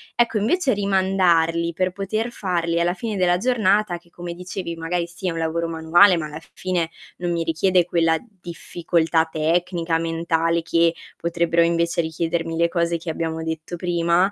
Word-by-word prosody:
Ecco, 235 Hz, -2 st, +2 dB
invece 270 Hz, -, +1 dB
rimandarli 185 Hz, -4 st, +2 dB
per 185 Hz, +2 st, 0 dB
poter 215 Hz, +5 st, -2 dB
farli 170 Hz, -5 st, -1 dB
alla 175 Hz, +1 st, +1 dB
fine 220 Hz, 0 st, -4 dB
della 180 Hz, -1 st, +3 dB
giornata, 210 Hz, -5 st, +2 dB
che 170 Hz, 0 st, -22 dB
come 175 Hz, 0 st, -7 dB
dicevi 180 Hz, -1 st, -5 dB
magari 170 Hz, +1 st, -2 dB
sì, 170 Hz, +2 st, -6 dB
è -, -, -2 dB
un 165 Hz, -, -5 dB
lavoro 165 Hz, +1 st, -1 dB
manuale, 170 Hz, +4 st, +5 dB
ma 155 Hz, -, -3 dB
alla 150 Hz, +1 st, -7 dB
fine 175 Hz, -3 st, -2 dB, 0.3 s
non 175 Hz, -1 st, -2 dB
mi 170 Hz, -1 st, 0 dB
richiede 175 Hz, +2 st, +2 dB
quella 165 Hz, -2 st, +2 dB, 0.2 s
difficoltà 165 Hz, -1 st, 0 dB
tecnica, 165 Hz, +1 st, 0 dB
mentale 165 Hz, 0 st, 0 dB
che 165 Hz, 0 st, +2 dB, 0.2 s
potrebbero 170 Hz, 0 st, +1 dB
invece 170 Hz, +1 st, +1 dB
richiedermi 165 Hz, 0 st, -2 dB
le 170 Hz, 0 st, +3 dB
cose 170 Hz, -1 st, 0 dB
che 165 Hz, 0 st, -7 dB
abbiamo 160 Hz, 0 st, -3 dB
detto 160 Hz, +2 st, -4 dB
prima, 175 Hz, +2 st, +2 dB
170 Hz, 165 wpm, -22 LUFS, 165-185 Hz, 0.3 s, manuale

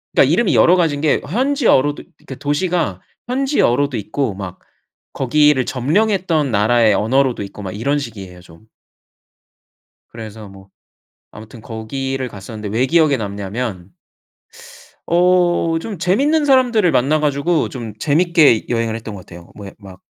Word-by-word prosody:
그니까 135 Hz, -, +4 dB
이름이 200 Hz, +4 st, +2 dB
여러 175 Hz, -, +5 dB
가지인 155 Hz, -5 st, 0 dB
게 155 Hz, -, +2 dB
현지어로도 225 Hz, -, +1 dB
그니까 135 Hz, -, -10 dB
도시가 145 Hz, -, -2 dB, 0.3 s
현지어로도 240 Hz, -, +1 dB
있고 110 Hz, +2 st, -3 dB
막 95 Hz, -2 st, -8 dB, 0.5 s
거기를 140 Hz, 0 st, +2 dB
점령했던 165 Hz, -, 0 dB
나라의 110 Hz, +1 st, +3 dB
언어로도 125 Hz, +2 st, +1 dB
있고 100 Hz, +1 st, -10 dB
막 95 Hz, -2 st, -6 dB
이런 140 Hz, +7 st, -1 dB
식이에요 100 Hz, -9 st, -9 dB
좀. 90 Hz, +4 st, -19 dB, 1.4 s
그래서 110 Hz, -2 st, -10 dB
뭐 95 Hz, 0 st, -15 dB, 0.6 s
아무튼 110 Hz, +2 st, -12 dB
거기를 130 Hz, +4 st, -5 dB
갔었는데 105 Hz, 0 st, -8 dB
왜 125 Hz, +3 st, +2 dB
기억에 155 Hz, -1 st, +3 dB
남냐면 100 Hz, -2 st, -5 dB, 1.2 s
어 180 Hz, +1 st, +3 dB, 0.3 s
좀 205 Hz, +1 st, -7 dB
재밌는 275 Hz, -, +1 dB
사람들을 245 Hz, -9 st, +3 dB
만나 145 Hz, +5 st, +2 dB
가지고 150 Hz, +3 st, 0 dB
좀 115 Hz, -5 st, -7 dB
재밌게 155 Hz, -3 st, +3 dB
여행을 115 Hz, -2 st, -1 dB
했던 110 Hz, -2 st, -8 dB
것 95 Hz, -3 st, -10 dB
같아요. 85 Hz, 0 st, -13 dB
뭐 100 Hz, -, -10 dB
예 95 Hz, -, -10 dB
막 95 Hz, -3 st, -14 dB
130 Hz, 315 characters per minute, -18 LUFS, 110-170 Hz, 1.4 s, 여러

